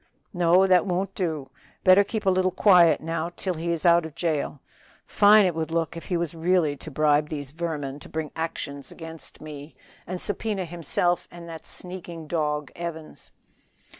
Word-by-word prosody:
"No, 175 +1 +4
that 185 -1 +4
won't 190 +2 -1
do; 160 -7 -3 0.3
better 185 +2 +7
keep 215 +1 -4
a 190 - +5
little 185 0 +2
quiet 180 -3 +5
now 165 +1 -2
till 185 - -2
he 170 +1 -3
is 170 +1 -2
out 170 0 +6
of 160 -2 -8
the - - -26
jail. 155 -4 -1 0.5
Fine 210 0 +6
it 180 - +1
would 160 0 -3
look 165 -1 -1
if 165 - -8
he 180 - -1
was 170 -2 -2
really 165 -2 +1
to 160 - -8
bribe 150 +1 +2
these 145 -3 -5
vermin 150 -4 -4
to - - -11
bring 160 -1 -4
actions 145 -4 -5
against 165 -1 -8
me, 150 0 -9 0.3
and 180 +1 -4
subpoena 205 -1 -2
himself 175 +1 0
and 175 -1 -11
that 165 -2 -9
sneaking 175 -3 -7
dog, 150 -3 -2
Evans." 165 -2 -7
165 Hz, 180 wpm, -25 LUFS, 155-180 Hz, 0.5 s, better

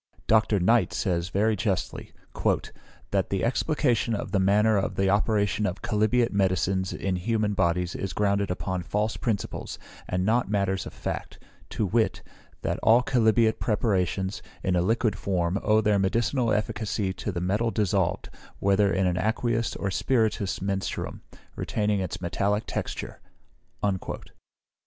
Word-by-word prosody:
Dr. 110 -2 +3
Knight 115 +6 +3
says 85 -3 -1
very 105 +4 +2
justly, 95 -4 -2 1.0
"that 95 -2 +1
the 95 - -1
explication 120 -3 +1
of - - -5
the 100 - +2
manner 105 +3 +4
of 100 - 0
the 95 0 +2
operation 105 0 +1
of 95 +1 -5
chalybeate 115 +3 +2
medicines 95 -1 +1
in 95 -2 -2
human 105 +2 0
bodies 90 -1 +1
is 95 - -4
grounded 100 -1 +1
upon 90 0 -2
false 105 +5 -1
principles, 110 -5 -3 0.3
and 90 +1 0
not 115 +2 +2
matters 100 -2 0
of - - -9
fact; - - -5 0.3
to 110 - -1
wit, 110 +4 0 0.4
that - - -1
all 115 +3 +5
chalybeate 110 -2 +3
preparations, 95 -3 0 0.2
in 95 -2 +1
a 90 - +3
liquid 110 +2 +1
form, 90 0 -1
owe 110 +1 +3
their 105 -1 +2
medicinal 115 +5 +1
efficacy 105 -2 -1
to 105 - -4
the 90 - -3
metal 100 +6 0
dissolved, 95 -5 0 0.3
whether 100 0 +3
in 95 -1 +1
an 90 -1 +1
aqueous 115 +3 0
or 100 - -2
spirituous 110 -3 0
menstruum, 95 -1 -3 0.3
retaining 105 -1 0
its 95 -3 -3
metallic 100 +4 0
texture." - - -5
100 Hz, 140 wpm, -26 LUFS, 95-110 Hz, 1.0 s, all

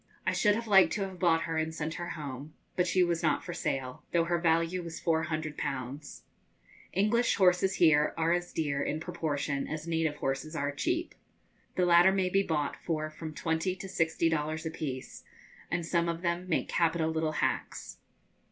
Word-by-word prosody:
I - - +1
should 205 -1 +3
have 230 +1 -3
liked 195 -3 +6
to 210 - -2
have 190 -2 -6
bought 165 -3 +3
her 165 -1 -2
and 160 0 -2
sent 160 0 -3
her 175 0 -5
home, 145 +1 -7 0.2
but 180 0 +2
she 185 +1 +3
was 170 -1 0
not - - +1
for 175 - -5
sale, 130 -4 -3
though 170 -1 +4
her 170 +1 0
value 165 +2 +2
was 170 -1 -7
400_l_. 155 -4 -2 0.7
English 225 +5 +2
horses 185 0 +3
here 155 -3 +4
are 165 +1 +2
as 175 0 -2
dear, 145 -3 -1
in 155 - -1
proportion, 145 -4 -2
as 155 +1 -5
native 160 -2 0
horses 145 +3 -3
are 145 -2 -1
cheap. 330 - -1 0.6
The 180 - +2
latter 175 +2 +6
may 190 -1 +1
be 195 - +4
bought 150 -6 -1
for 155 -2 -2
from 155 0 -8
twenty 165 +3 -1
to 195 - -8
sixty 165 -2 +1
dollars 155 0 -1
apiece; 145 -5 -5 0.5
and 175 -1 -1
some 170 0 +1
of 170 +1 -4
them 175 +1 -1
make 165 - +1
capital 165 -1 +1
little 160 -1 -1
hacks. - - -2
165 Hz, 180 wpm, -30 LUFS, 155-175 Hz, 0.7 s, liked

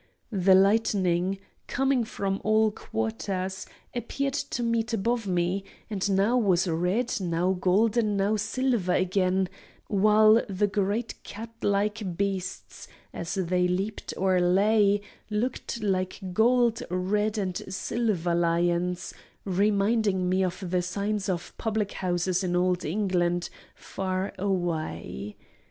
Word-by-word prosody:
The 190 -2 +4
lightning, 190 -2 +2 0.3
coming 265 -2 +1
from 195 -2 -3
all 215 0 +3
quarters, 185 - -3 0.3
appeared 270 +3 -2
to 245 -3 -2
meet 230 -1 0
above 225 +1 0
me, 180 +1 0 0.3
and 205 -1 -1
now 200 +6 +3
was 190 -4 +2
red, 180 +9 0
now 175 +1 +1
golden, 210 +4 +2
now 200 +2 +2
silver 215 -2 0
again, 185 0 +1 0.4
while 215 +2 +5
the 195 +1 +1
great 205 +3 -1
cat 225 +3 -8
like 205 -2 0
beasts, 195 -2 -3 0.3
as 170 +3 -4
they 180 -1 +1
leaped 195 +4 -2
or 185 -1 +2
lay, 200 +3 +3 0.3
looked 230 +1 -2
like 185 -2 -1
gold, 235 +2 +3
red, 205 +4 0
and 185 -3 -1
silver 190 -4 -1
lions, 175 +1 0 0.3
reminding 200 0 +2
me 185 +1 +2
of 185 +1 -3
the 180 +1 +1
signs 200 +3 -2
of 175 -2 -3
public 215 -2 -1
houses 180 +1 -1
in 175 -1 0
old 180 0 +1
England, 175 -1 0 0.2
far 190 0 -3
away. 160 - -2
195 Hz, 120 wpm, -27 LUFS, 180-215 Hz, 0.4 s, while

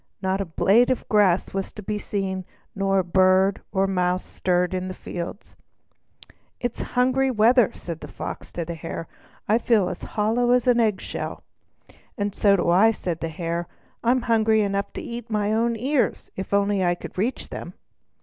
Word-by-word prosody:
Not 190 0 0
a - - -2
blade 200 +8 +3
of 255 - -1
grass 200 -4 +3
was 195 0 -3
to 210 - -9
be 210 +2 -2
seen, 190 -2 -3 0.3
not 195 -1 +1
a 190 - +3
bird 185 +2 +3
or 195 0 +2
mouse 180 -1 0
stirred 180 0 0
in 185 0 -2
the 185 - -6
fields. 175 +3 -7 1.0
"It's 245 -1 -3 0.2
hungry 260 +2 +3
weather," 235 0 +4
said 170 -2 -7
the - - -7
Fox - - -7
to 170 - -3
the 170 - -4
Hare. 165 0 -6 0.4
"I 220 +3 +3
feel 220 -6 +2
as 180 - -6 0.2
hollow 235 +4 +2
as 250 -2 +3
an 245 -1 +4
egg 215 -4 +2
shell." - - -5 0.7
"And 205 -1 -1
so 200 -1 +4
do 175 - 0
I," 190 +6 +6
replied 180 -7 -1
the 165 - -3
Hare. 170 +1 -3 0.4
"I'm 245 +1 +2
hungry 220 -2 +3
enough 200 0 -1
to - - -5
eat 235 0 -7
my 210 -1 0
own 230 +1 +1
ears, 260 +4 -1
if 190 - -6
only 200 -1 +2
I 175 0 +2
could - - -10
reach 225 +8 -2
them." - - -7
200 Hz, 185 wpm, -24 LUFS, 185-225 Hz, 1.0 s, I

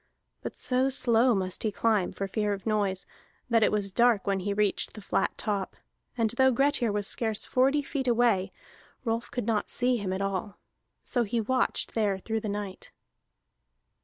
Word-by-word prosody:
But - - -6
so 255 +1 +1
slow 240 -2 +3
must 185 -1 -1
he 215 - 0
climb, 210 -3 +1
for 195 - -4
fear 210 +1 0
of 195 - -7
noise, 205 -4 0 0.5
that 230 -1 +4
it - - +4
was 205 -2 -1
dark 235 -1 +3
when 195 -1 +1
he 200 +2 -2
reached 205 -1 0
the - - -9
flat 195 - -1
top; 200 -3 -2 0.4
and 225 -2 +2
though 265 +2 +4
Grettir 265 -2 +2
was 205 0 -1
scarce 220 0 -1
forty 270 +3 +2
feet 275 -2 -3
away, 230 -6 +2 0.5
Rolf 230 +1 -1
could 245 -3 -3
not 215 -2 0
see 250 0 +1
him 200 -4 -3
at 190 - -2
all. 195 +1 -3 0.5
So 245 - 0
he 230 +2 -1
watched 255 +4 0
there 205 -4 +1
through 220 +3 -3
the 215 - -4
night. 200 -2 -5
215 Hz, 180 wpm, -28 LUFS, 200-240 Hz, 0.5 s, that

